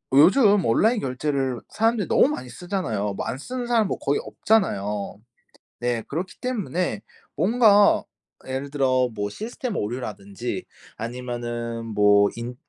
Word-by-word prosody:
요즘 200 Hz, -, +6 dB
온라인 220 Hz, -, +3 dB
결제를 135 Hz, -1 st, -1 dB
사람들이 225 Hz, -1 st, +1 dB
너무 -, -, +5 dB
많이 130 Hz, -, -4 dB
쓰잖아요. 120 Hz, -, -3 dB
뭐 -, -, -4 dB
안 -, -, -3 dB
쓰는 250 Hz, -, -5 dB
사람 230 Hz, -3 st, +3 dB
뭐 -, -, -2 dB
거의 140 Hz, -, 0 dB
없잖아요. 105 Hz, -, 0 dB, 0.6 s
네. 120 Hz, -2 st, -1 dB
그렇기 180 Hz, +6 st, -4 dB
때문에 195 Hz, -, -2 dB, 0.4 s
뭔가 210 Hz, -2 st, +5 dB, 0.4 s
예를 130 Hz, +2 st, -3 dB
들어 130 Hz, -3 st, +2 dB
뭐 105 Hz, -1 st, -3 dB
시스템 230 Hz, -, -5 dB
오류라든지 105 Hz, -2 st, -4 dB, 0.3 s
아니면은 120 Hz, -1 st, -4 dB
뭐 105 Hz, -1 st, +4 dB
인 120 Hz, +1 st, -5 dB
130 Hz, 290 characters per minute, -24 LUFS, -, 0.6 s, 요즘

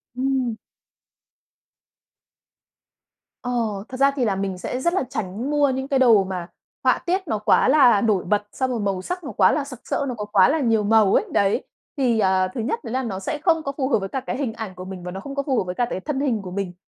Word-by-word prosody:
Ừm. 260 Hz, -2 st, 0 dB, 2.9 s
Ồ, 230 Hz, -5 st, -2 dB
thật 255 Hz, -, -6 dB
ra 275 Hz, +1 st, +4 dB
thì 260 Hz, -4 st, 0 dB
là 200 Hz, -3 st, +1 dB
mình 195 Hz, -1 st, -3 dB
sẽ 250 Hz, +7 st, -4 dB
rất 340 Hz, +6 st, +1 dB
là 380 Hz, -, +1 dB
tránh 220 Hz, 0 st, -4 dB
mua 290 Hz, -1 st, +3 dB
những 265 Hz, 0 st, -2 dB
cái 275 Hz, -1 st, +1 dB
đồ 230 Hz, -6 st, +6 dB
mà 185 Hz, -2 st, -5 dB, 0.4 s
họa -, -, +4 dB
tiết 370 Hz, +1 st, -1 dB
nó 220 Hz, -, 0 dB
quá 210 Hz, -, +3 dB
là 255 Hz, -8 st, +6 dB
nổi 210 Hz, -5 st, +2 dB
bật, 205 Hz, +2 st, +1 dB
xong 260 Hz, -1 st, -1 dB
rồi 240 Hz, -, -2 dB
màu 195 Hz, -3 st, -1 dB
sắc 360 Hz, -, -5 dB
nó 285 Hz, -, -6 dB
quá -, -, +4 dB
là 300 Hz, -, 0 dB
sặc 265 Hz, -4 st, -9 dB
sỡ, 280 Hz, -, -2 dB
nó 250 Hz, -, -3 dB
có 210 Hz, -2 st, -5 dB
quá 200 Hz, -3 st, +4 dB
là 315 Hz, +3 st, +1 dB
nhiều 225 Hz, -6 st, +2 dB
màu 210 Hz, -1 st, +4 dB
ấy, -, -, +3 dB
đấy. 200 Hz, 0 st, +2 dB, 0.3 s
Thì, 245 Hz, -5 st, +2 dB
ờ, 190 Hz, -2 st, +3 dB
thứ 235 Hz, -, -3 dB
nhất 275 Hz, -, -2 dB
đấy 230 Hz, -, -6 dB
là 260 Hz, +1 st, 0 dB
nó 200 Hz, -6 st, -4 dB
sẽ 195 Hz, +10 st, -3 dB
không 325 Hz, -3 st, +2 dB
có 275 Hz, -, -2 dB
phù 265 Hz, -2 st, 0 dB
hợp 250 Hz, -, +3 dB
với 195 Hz, 0 st, -5 dB
cả 265 Hz, -, -2 dB
cái 255 Hz, -, -4 dB
hình 260 Hz, -5 st, -2 dB
ảnh 220 Hz, -5 st, -7 dB
của 185 Hz, +1 st, -8 dB
mình 185 Hz, -1 st, -8 dB
và 180 Hz, -, -5 dB
nó 190 Hz, -, -6 dB
không 275 Hz, +7 st, -8 dB
có 280 Hz, -, -1 dB
phù 270 Hz, -3 st, 0 dB
hợp -, -, +2 dB
với 180 Hz, 0 st, -5 dB
cả 245 Hz, -, +1 dB
cái 185 Hz, -, -3 dB
thân 270 Hz, +7 st, -3 dB
hình 255 Hz, -7 st, 0 dB
của 185 Hz, -2 st, -8 dB
mình. 190 Hz, -1 st, -3 dB
230 Hz, 255 wpm, -23 LUFS, 195-270 Hz, 2.9 s, đồ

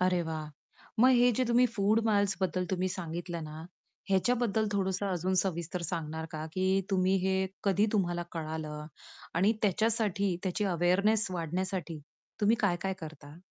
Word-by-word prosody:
अरे 180 Hz, -1 st, +2 dB
वाह! 155 Hz, -2 st, -5 dB, 0.5 s
मग 255 Hz, +2 st, +7 dB
हे 245 Hz, +1 st, +5 dB
जे 255 Hz, -, +3 dB
तुम्ही 245 Hz, +1 st, +4 dB
फूड 210 Hz, +2 st, +3 dB
माइल्सबद्दल 195 Hz, -3 st, +1 dB
तुम्ही 185 Hz, 0 st, 0 dB
सांगितलं 175 Hz, -1 st, -5 dB
ना, 155 Hz, 0 st, -8 dB, 0.5 s
ह्याच्याबद्दल 220 Hz, +2 st, +2 dB
थोडंसं 190 Hz, 0 st, 0 dB
अजून 185 Hz, 0 st, 0 dB
सविस्तर 175 Hz, -1 st, -3 dB
सांगणार 160 Hz, -1 st, -4 dB
का, 155 Hz, 0 st, -4 dB
की 190 Hz, +2 st, +2 dB
तुम्ही 190 Hz, 0 st, +3 dB
हे 190 Hz, -, +2 dB, 0.3 s
कधी 200 Hz, +1 st, +3 dB
तुम्हाला 175 Hz, -4 st, +1 dB
कळालं 155 Hz, -2 st, -5 dB, 0.5 s
आणि 195 Hz, +6 st, +4 dB
त्याच्यासाठी 205 Hz, -2 st, +1 dB
त्याची 190 Hz, +2 st, -1 dB
अवेअरनेस 195 Hz, +5 st, +2 dB
वाढण्यासाठी 175 Hz, -1 st, -3 dB, 0.4 s
तुम्ही 215 Hz, +2 st, +4 dB
काय-काय 190 Hz, -1 st, +1 dB
करता? 155 Hz, -1 st, -9 dB
185 Hz, 140 wpm, -30 LUFS, 170-200 Hz, 0.5 s, मग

